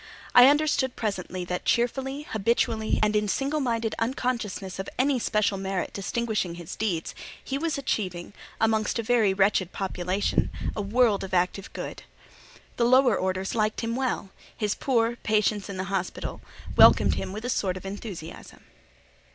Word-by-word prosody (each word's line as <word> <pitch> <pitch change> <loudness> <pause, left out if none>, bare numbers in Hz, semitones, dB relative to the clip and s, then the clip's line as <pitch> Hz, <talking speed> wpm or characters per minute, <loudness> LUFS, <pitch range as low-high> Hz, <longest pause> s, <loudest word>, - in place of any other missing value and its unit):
I 245 +1 +9
understood 285 -3 +2
presently 185 -4 -3
that 180 0 -3
cheerfully, 265 +4 0
habitually, 220 0 +1
and 215 0 +2
in 210 0 +2
single 275 +8 0
minded 230 -4 -1
unconsciousness 225 -6 -2
of 190 - -4
any 265 0 +2
special 210 -3 +1
merit 190 -1 -3
distinguishing 210 -3 -2
his 170 -2 -8
deeds—he 215 +7 -4
was 325 -1 -1
achieving, 185 -9 -3 0.3
amongst 220 0 +1
a 230 - -1
very 220 -3 +3
wretched 190 -1 +2
population, 190 0 -1 0.3
a - - -2
world 215 0 +2
of 190 -1 -3
active 180 +3 0
good. - - -6 0.8
The 235 - +3
lower 255 -2 +5
orders 190 0 -2
liked 215 -1 0
him 230 0 -2
well; 255 -7 -2 0.3
his 210 -2 0
poor, 235 -3 +1
patients 210 -2 0
in 195 - -5
the 185 - -2
hospitals 185 -2 -3 0.3
welcomed - - +7
him - - -3
with 215 +4 -6
a - - -2
sort 185 -5 0
of 185 - -10
enthusiasm. 195 -4 -8
215 Hz, 150 wpm, -26 LUFS, 190-240 Hz, 0.8 s, I